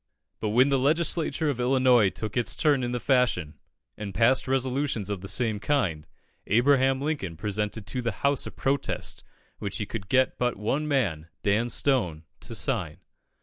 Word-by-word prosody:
But 110 - -2
when 125 +6 +4
the 135 -1 +2
Legislature 160 +2 +1
of 125 - -6
Illinois 125 -4 +4
took 110 +2 -6
its 120 -2 +1
turn 145 -4 +2
in 120 -1 -2
the 125 - -2
fashion, 115 - +1 0.4
and 105 -2 -7
passed 120 +4 +3
resolutions 130 -5 -1
of 100 -3 -4
the 95 - -7
same 110 +1 0
kind, 95 - -1 0.4
Abraham 130 +3 +3
Lincoln 140 - -3
presented 105 +3 -3
to 125 - -3
the 120 -1 -1
House 140 -1 +1
a - - -6
protest 140 0 -2 0.4
which 100 - -4
he 105 - -2
could 100 -3 -7
get 130 0 +2
but 125 -1 0
one 135 +9 -1
man, 100 - 0 0.2
Dan 110 +4 +1
Stone, 115 - +1 0.2
to - - -8
sign. 75 +2 -1
120 Hz, 170 wpm, -26 LUFS, 105-135 Hz, 0.4 s, when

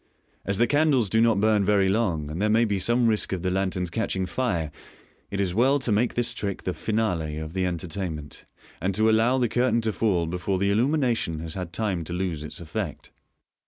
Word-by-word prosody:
As 100 0 0
the 120 - +4
candles 140 -6 +2
do 110 - +4
not 115 -3 +3
burn 105 -1 +3
very 100 -1 +3
long, 90 -8 0
and 85 +5 -4
there 105 - +2
may 115 +2 +4
be 100 -3 -1
some 120 +5 +2
risk 110 -3 +1
of 90 -2 -3
the 90 - 0
lanterns 95 -2 -1
catching 95 -2 -1
fire, 85 -6 -1 0.6
it 100 - -4
is 95 -3 0
well 130 +7 +3
to 130 -4 -1
make 110 +4 +1
thistricK 115 -5 -1
the 90 - -2
finale 90 -10 -1
of 80 +1 -6
the 95 -1 0
entertainment, 85 -3 -5 0.4
and 95 +2 0
to 110 +2 +3
allow 115 +4 +3
the 125 -2 +2
curtain 120 +1 +1
to 110 -1 -1
fall 95 -7 +1
before 90 +3 -2
the 100 +2 +1
illumi 125 +9 +2
nation 115 - 0
has 80 -1 -5
had 90 -3 -5
time 95 -4 -2
to 85 - -5
lose 90 -4 -2
its 75 - -7
effect. 80 -3 -5
100 Hz, 210 wpm, -25 LUFS, 90-115 Hz, 0.6 s, the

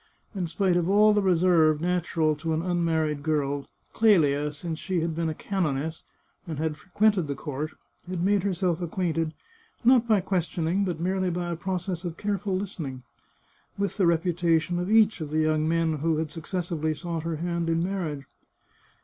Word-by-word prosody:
In 185 -4 -2
spite 180 +1 +1
of 175 0 0
all 210 +2 +6
the 205 - +3
reserve 170 -4 +4
natural 165 -2 +1
to 160 +2 -2
an 160 - -1
unmarried 165 -4 0
girl, 145 -2 -1 0.3
Clelia, 150 -9 +3
since 160 +2 -5
she 185 -3 -1
had 165 0 -1
been 165 0 -1
a 155 - -4
canoness, 160 -5 -2 0.4
and 160 -3 -4
had 155 0 -1
fre 180 - -21
quented 200 -3 +3
the 140 - -2
court, 150 +2 -5 0.4
had 180 -2 -2
made 200 +1 +3
herself 180 -2 0
acquainted 165 -2 -1 0.2
— 455 -9 -34
not 245 -1 +5
by 215 -3 +4
questioning, 180 0 0
but 175 -4 -3
merely 185 +1 0
by 175 0 -2
a - - -1
process 180 0 -3
of 170 -2 -5
careful 200 -1 -1
listening 155 -10 -5 0.4
— - - -38
with 200 +1 -2
the 190 -4 +3
reputation 170 0 +1
of 180 +2 -2
each 220 -4 +4
of 155 - -4
the 155 +1 +1
young 155 0 +1
men 165 -2 +1
who 160 +1 +1
had 155 -1 -2
suc 165 0 -9
cessively 165 -4 -2
sought 170 -2 -3
her 165 0 -3
hand 170 +1 -2
in 165 0 +1
marriage. 170 -7 -3
170 Hz, 185 wpm, -26 LUFS, 155-185 Hz, 0.4 s, all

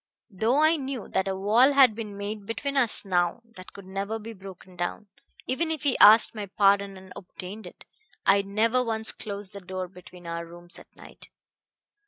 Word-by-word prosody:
Though 220 +8 +1
I 320 +1 +4
knew 265 -5 -5
that 190 0 0
a 190 - -1
wall 225 +8 +4
had 265 -5 +6
been 210 -2 -7
made 200 0 -6
between 280 +5 -3
us 240 -6 +2
now 180 +4 0
that 185 0 -11
could 200 - -12
never 195 +3 -4
be 225 +1 -9
broken 190 -2 -13
down 175 +4 -4 0.4
even 315 +6 -1
if 315 -3 -3
he 280 -3 +2
asked 220 +2 +7
my 210 -2 -6
pardon 200 0 +2
and 190 0 -13
obtained 190 +2 -9
it - - -14 0.4
I 200 +1 +5
never 220 +5 +1
once 220 -2 -2
closed 200 -2 -7
the 200 - -7
door 185 0 -5
between 180 -1 -15
our 170 0 -4
rooms 175 +1 -10
at - - -16
night. - - -14
200 Hz, 190 wpm, -26 LUFS, 190-230 Hz, 0.4 s, asked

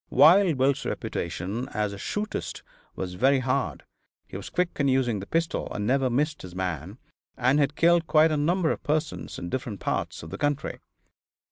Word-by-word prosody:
Wild 165 +4 +6
Bill's 135 +1 +2
reputation 95 +9 -3
as 105 -1 0
a - - -7
"shootist" 210 - -4 0.3
was 90 -1 -4
very 135 +9 +3
hard; 130 +1 -1 0.4
he - - -12
was - - -6
quick 180 -1 +1
in 140 - +3
using 130 -5 +2
the 95 - -8
pistol 165 0 -1
and 105 - -3
never 130 +2 +2
missed 150 +5 0
his 90 -1 -10
man, 90 - -3 0.4
and 130 +4 +3
had 145 0 +1
killed 170 0 +4
quite 155 0 +5
a - - +1
number 165 +3 +2
of - - -3
persons 155 +1 -2
in 85 - -5
different 120 -5 -4
parts - - -2
of 80 - -9
the - - -6
country. 145 -1 -1
135 Hz, 180 wpm, -26 LUFS, 105-155 Hz, 0.4 s, Wild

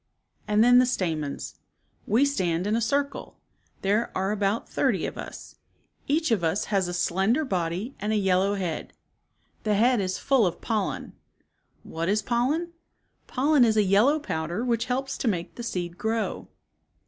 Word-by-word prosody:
And 210 +1 +4
then 245 +1 +7
the 255 - +4
stamens. 160 - -3 0.2
" - - -45 0.2
We 235 +7 +4
stand 180 -10 0
in 210 +2 +1
a 230 - +1
circle. 280 +5 -2 0.5
There 210 +4 +1
are 190 +2 0
about 205 +1 0
thirty - - 0
of - - -5
us. - - -9 0.5
Each 310 0 +1
of 205 -6 +2
us 165 +5 0
has 195 -2 +3
a - - -4
28 175 - -3
slender 205 - +1
body 185 +4 -2
and 210 +2 -2
a - - +2
yellow 195 0 +2
head. 180 -5 -4 0.7
The 210 -1 +1
head 240 +2 +3
is 185 -1 -2
full 260 -8 +3
of 175 - -4
pollen. 215 -4 -2 0.7
What 165 +2 -3
is 210 +1 +1
pollen? 285 +10 0 0.5
Pollen 280 +1 +3
is 220 -2 +3
a 210 - +5
yellow 210 +10 +4
powder 175 - -3
which 235 -1 0
helps 265 +2 -2
to - - -1
make 175 -6 -1
the - - -8
seed 180 -6 -4
grow." 225 0 -2
215 Hz, 170 wpm, -26 LUFS, 185-245 Hz, 0.7 s, then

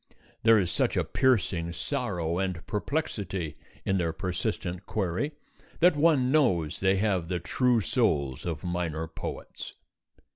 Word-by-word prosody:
There 115 0 +6
is 90 -4 +1
such - - +1
a - - +3
piercing 95 -10 +1
sorrow 90 - -2
and 95 -3 -2
perplexity 100 - -2 0.3
in 95 -1 +1
their 85 -2 0
persistent 90 +1 -3
query 105 - -1 0.5
that 175 -1 +5
one 145 -4 +3
knows 95 - +2
they 95 0 +3
have 95 -4 +1
the 90 0 -1
true 125 +6 +2
souls 75 - 0
of 80 -4 -4
minor 85 -3 -2
poets. 80 - -7
95 Hz, 135 wpm, -28 LUFS, 85-120 Hz, 0.5 s, There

